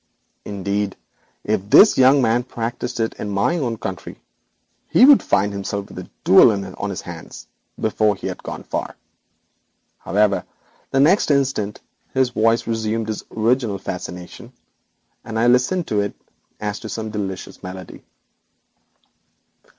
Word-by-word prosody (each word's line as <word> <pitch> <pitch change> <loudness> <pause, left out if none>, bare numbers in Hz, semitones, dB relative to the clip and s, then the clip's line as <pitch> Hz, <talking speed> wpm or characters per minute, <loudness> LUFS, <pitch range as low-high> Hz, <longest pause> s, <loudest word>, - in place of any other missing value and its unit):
Indeed, 100 0 -2 0.5
if 105 -2 -1
this 210 - +8
gentleman 130 -3 +4
practised 120 0 -5
such 115 -2 -1
a - - -27
barbarism - - -4
in - - -4
my 100 - +1
own 120 -6 -2
country 95 -4 -7 0.7
he 250 - +6
would 285 -1 +8
find 100 +1 +1
himself 100 0 -4
with - - -9
a - - -9
duel - - +7
on 100 0 -4
his 100 0 -5
hands 85 -2 -10 0.3
before 110 -1 +1
he - - -10
had - - -4
gone - - -7
far. - - -4 1.0
However, 100 0 +1 0.5
the 135 - +1
next 165 +8 +4
instant 135 -8 0 0.3
his 130 -1 +2
voice 115 +1 +2
resumed 110 -1 -2
its 105 - -5
original 115 -2 0
fascination, 90 +5 -8 0.7
and 110 - -5
I 115 - +2
listened 125 +9 +3
to 105 - +1
it 100 - -3 0.4
as 105 0 -3
to 110 - -8
some 110 -1 -4
delicious 95 -3 -5
melody. 90 0 -9
110 Hz, 145 wpm, -21 LUFS, 100-120 Hz, 1.0 s, this